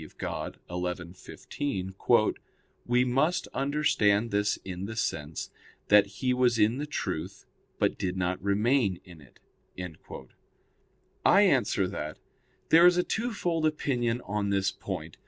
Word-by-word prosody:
Dei 90 +3 -5
xi, 85 -1 -10
15), 95 -1 -5 0.9
"we 125 +1 +3
must 140 +8 +1
understand 120 -7 +2
this 105 0 +1
in 95 0 -5
the 110 +2 -6
sense, 80 -8 -3 0.4
that 105 -1 +6
he 115 +6 -1
was 125 -2 +2
in 110 +4 +2
the 150 - -3
truth, 150 - -4 0.3
but - - 0
did 95 0 -2
not 90 0 -1
remain 100 0 +1
in 85 -4 -14
it." 70 - -20 1.8
I 200 - +6
answer 120 - +2
that, 80 -5 -5 0.5
There 170 +2 +8
is 180 0 +4
a 180 - +3
twofold 180 -9 -1
opinion 125 -6 -1
on 100 -2 -2
this 95 -1 +1
point. 90 -4 -7
105 Hz, 130 wpm, -28 LUFS, 95-135 Hz, 1.8 s, There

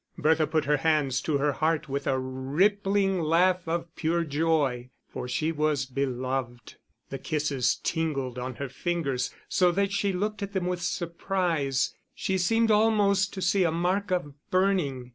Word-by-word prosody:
Bertha 155 0 +3
put 155 -1 0
her 150 +1 +3
hands 145 -3 +1
to 150 -3 0
her 145 +1 +1
heart 155 +2 0
with 140 0 -3
a 135 - +2
rippling 190 +9 +1
laugh 175 +3 +2
of 165 0 -3
pure 170 +1 0
joy 145 -5 0 0.2
for - - -6
she 155 +6 0
was 150 -3 0
beloved. 130 -2 -3 0.3
The 135 - -4
kisses 150 -5 0
tingled 140 -7 -2
on 125 0 -5
her 140 - -4
fingers 135 -2 -2 0.2
so 180 -1 +3
that 200 +2 +1
she 200 0 0
looked 205 +3 -2
at 200 0 -4
them 190 -2 -1
with 180 -1 -2
surprise, 170 -6 -1 0.2
she 190 -1 -1
seemed 225 +5 +2
almost 205 -2 +3
to 190 - -3
see 185 +1 +3
a 170 - +3
mark 180 +5 0
of 175 -6 -1 0.2
burning. 180 -10 +1
160 Hz, 160 wpm, -27 LUFS, 140-185 Hz, 0.3 s, Bertha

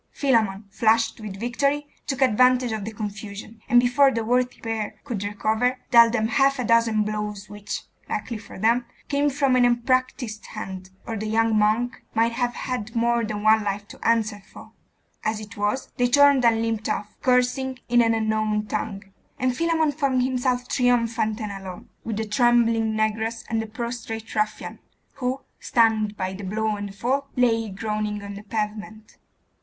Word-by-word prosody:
Philammon, 220 -7 +1
flushed 225 +2 +2
with 200 -2 -7
victory, 280 +5 0 0.2
took 270 -1 +1
advantage 250 +1 +4
of 215 -2 -3
the 220 - -4
confusion, 215 +1 -7
and 245 - +7
before 250 +3 +4
the 230 -4 -2
worthy 250 +2 +1
pair 225 -2 -3
could 235 -8 -4
recover, 220 +5 0
dealt 235 -1 +8
them 220 -2 +1
half 275 +3 +3
a 250 - -1
dozen 230 -2 +3
blows 210 -1 -4
which, 205 0 -5 0.3
luckily 230 -3 -3
for 205 - -12
them, 230 +4 +2 0.2
came 285 0 +2
from 275 -2 +2
an 250 - +4
unpractised 245 -2 0
hand, 190 -3 -7 0.2
or 230 - -4
the 215 0 -4
young 225 0 +2
monk 215 +4 +1
might 230 +1 +3
have 240 0 -1
had 235 -4 -4
more 235 0 +2
than 210 -1 -4
one 215 0 +5
life 205 0 -3
to - - -13
answer 220 -3 +1
for. - - -13 0.5
As 215 0 -1
it 215 +1 -10
was, 205 +5 -2
they 245 - +3
turned 280 0 +5
and 225 -1 +3
limped 225 -1 -2
off, 210 0 -3
cursing 255 +1 +1
in 240 0 +4
an 225 -1 +3
unknown 215 -1 0
tongue; 205 -1 -4 0.3
and 255 -1 0
Philammon 325 0 +1
found 275 -3 +1
himself 250 -1 0
triumphant 230 -3 +1
and 210 -2 -4
alone, 190 -2 -8
with 220 -2 -3
the 220 - -1
trembling 230 0 +3
negress 220 +1 -1
and 225 -1 +1
the 225 - -5
prostrate 225 0 -5
ruffian, 215 -1 -2 0.4
who, 260 0 -2 0.2
stunned 220 -3 +2
by 185 0 -2
the 200 +2 -8
blow 215 +2 -1
and 205 0 -5
the - - -11
fall, 265 +7 -1
lay 225 -3 +2
groaning 210 +1 -3
on 200 0 -7
the 200 - -8
pavement. 215 0 -5
225 Hz, 175 wpm, -24 LUFS, 215-245 Hz, 0.5 s, dealt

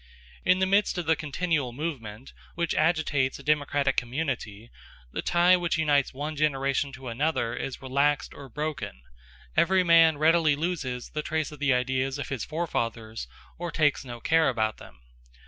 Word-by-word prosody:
In 185 - +4
the 190 - +2
midst 200 +1 +2
of 175 - -2
the 160 0 +3
continual 155 -4 -1
movement 130 -5 -6 0.2
which 170 -1 -1
agitates 155 -5 +1
a 140 - -12
democratic 145 -1 +1
community, 120 -5 -3 0.4
the - - -3
tie 175 +1 +4
which 175 0 0
unites 145 -4 +2
one 150 +3 -5
generation 140 -2 0
to 135 0 -9
another 120 -1 -1
is 135 +1 -5
relaxed 140 +2 +1
or 140 -1 -11
broken; 145 - -5 0.5
every 185 +2 +4
man 165 -3 +6
readily 160 0 +4
loses 145 -6 -3
the 150 - -2
trace 155 -1 -2
of 150 - -11
the 140 -3 +3
ideas 130 +2 -1
of 140 - -5
his 135 -5 -3
forefathers 115 - -3 0.3
or 175 0 -3
takes 150 -4 +1
no 120 -2 -8
care 160 +6 +3
about 110 -3 -1
them. 60 - -15
145 Hz, 165 wpm, -27 LUFS, 130-160 Hz, 0.5 s, man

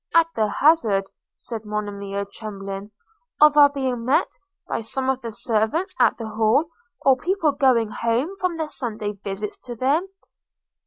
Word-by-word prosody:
– - - -12
'At 330 0 +4
the 220 -1 +1
hazard,' 210 -8 +3 0.2
said 225 -2 -6
Monimia, 200 -1 -4
trembling, 200 -1 -7 0.5
'of 300 0 +7
our 290 -1 +8
being 260 -4 -2
met 255 +4 +2 0.4
by - - -2
some 260 +4 -1
of 265 0 -4
the 230 -2 -5
servants 225 - -1
at - - +4
the 225 - -5
Hall, 220 +9 +2 0.3
or 270 -1 +7
people 330 +2 +1
going 255 -6 +2
home 240 +11 -1
from 365 -3 -1
their 315 -1 -2
Sunday's 215 -7 -5
visits 200 +1 -4
to 240 -1 -8
them?' 280 - +1
235 Hz, 160 wpm, -23 LUFS, 210-290 Hz, 0.5 s, our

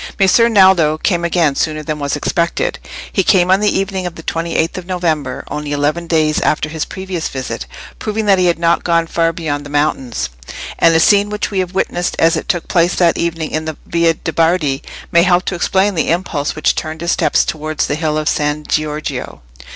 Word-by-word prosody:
Messer 215 +4 +4
Naldo 190 -7 +5
came 175 +1 0
again 170 -3 +2
sooner 155 +2 -2
than 155 -1 -4
was 140 0 -1
expected: 170 - -1 0.3
he 195 - +3
came 185 -1 +3
on 190 - +5
the 210 0 +2
evening 190 -1 -2
of 175 - -7
the 165 - -10
twenty 165 +1 -3
eighth 165 - 0
of 185 -1 -7
November, 160 -8 -2
only 150 0 -5
eleven 150 +4 -1
days 155 -2 +2
after 150 0 0
his 160 0 -3
previous 185 -3 -4
visit, 130 -1 -5 0.3
proving 215 0 -2
that 195 -2 +4
he 180 - +3
had 170 - +2
not 170 0 +1
gone 170 -1 +2
far 165 0 +1
beyond 155 -4 -3
the 145 - -10
mountains; 135 - -1 0.5
and 165 0 +5
a - - +5
scene 205 +4 +4
which 210 0 -3
we 195 - -1
have 185 0 -3
witnessed 175 -2 -1
as 165 +1 +3
it 155 - -5
took 175 -2 -1
place 175 0 +2
that 170 -2 +3
evening 165 -2 -2
in 155 0 -2
the 160 -1 -5
Via 170 -1 +2
de' 165 - -5
Bardi 165 -5 +1 0.3
may 170 - +5
help 180 +1 +3
to - - -2
explain 190 +3 +1
the 165 - -1
impulse 165 -4 -1
which 155 - +2
turned 155 +1 -5
his 170 0 0
steps - - +2
towards 155 0 -2
the - - -2
hill 155 0 -1
of 155 0 -2
San 150 0 0
Giorgio. 155 - -3
165 Hz, 215 wpm, -16 LUFS, 155-180 Hz, 0.5 s, Naldo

